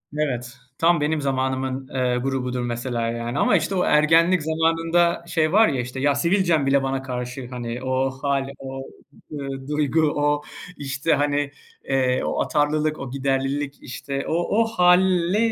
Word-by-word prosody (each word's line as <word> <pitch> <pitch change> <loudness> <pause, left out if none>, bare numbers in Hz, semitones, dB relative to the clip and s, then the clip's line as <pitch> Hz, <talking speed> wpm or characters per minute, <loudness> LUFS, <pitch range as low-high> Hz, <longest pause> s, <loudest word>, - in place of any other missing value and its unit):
Evet, 125 -5 -2 0.2
tam 170 -1 +3
benim 150 +1 0
zamanımın, 130 -1 -2
eee, 125 -2 +1
grubudur 125 -1 -2
mesela, 120 0 -3
yani, 120 +3 -3
ama, - - +3
işte, 165 +4 -2
o 180 - +2
ergenlik 165 +4 +4
zamanında 165 +2 +1
şey 155 -2 +1
var 220 +2 +6
ya, 135 -5 -1
işte, 125 +2 -6
"Ya, 140 +1 +2
sivilcem 170 -1 +2
bile 135 0 +3
bana 135 0 -1
karşı." 125 0 -5
hani, 120 0 -5
o 130 +1 0
hâl, 140 -1 0
o, 135 0 -6 0.5
ııı, 135 -2 -6
duygu, 150 +1 +1
o, 145 0 +1 0.4
işte, 140 +3 -1
hani, 145 0 0 0.3
eee, 130 -1 +1
o - - -1
atarlılık, 150 +1 0
o 135 -2 -6
giderlilik, 135 +1 -1
işte, 135 +2 -5
o - - -1 0.3
o - - +3
hâli, 180 +1 +4
140 Hz, 155 wpm, -23 LUFS, 130-160 Hz, 0.5 s, var